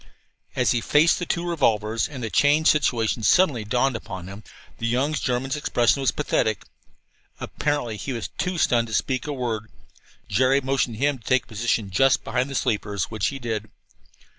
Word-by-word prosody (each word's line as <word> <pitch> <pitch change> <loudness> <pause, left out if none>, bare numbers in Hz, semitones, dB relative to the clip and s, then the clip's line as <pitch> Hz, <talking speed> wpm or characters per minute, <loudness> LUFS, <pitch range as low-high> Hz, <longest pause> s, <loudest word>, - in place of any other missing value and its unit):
As - - +2
he 120 - +1
faced 150 +7 +3
the 175 - -4
two 175 0 -2
revolvers, 115 -9 +1
and 135 -5 -7
the 110 - -4
changed 150 +2 +4
situation 120 -6 0
suddenly 135 - +3
dawned 125 +4 +1
upon 95 -5 -7
him, 100 +3 -10 0.4
the 115 - -1
young 130 +6 0
German's 130 -1 -1
expression 135 -3 +1
was 135 - +2
pathetic. 110 -2 0 0.8
Apparently 145 -7 -2
he 135 - -5
was 115 -3 -4
too 180 -1 -1
stunned 120 -6 +2
to 110 - -3
speak 130 -1 -1
a - - -2
word. 115 -5 -3 0.6
Jerry 130 +7 +3
motioned 135 -3 -1
him 140 +3 0
to - - -22
take 130 +3 +2
a - - -28
position 110 -2 -1
just 135 +8 +3
behind 125 +2 -1
the 140 - -6
sleepers, 105 -5 -1
which 110 -2 -1
he 140 - -3
did. 110 -4 -4
125 Hz, 180 wpm, -24 LUFS, 110-140 Hz, 0.8 s, changed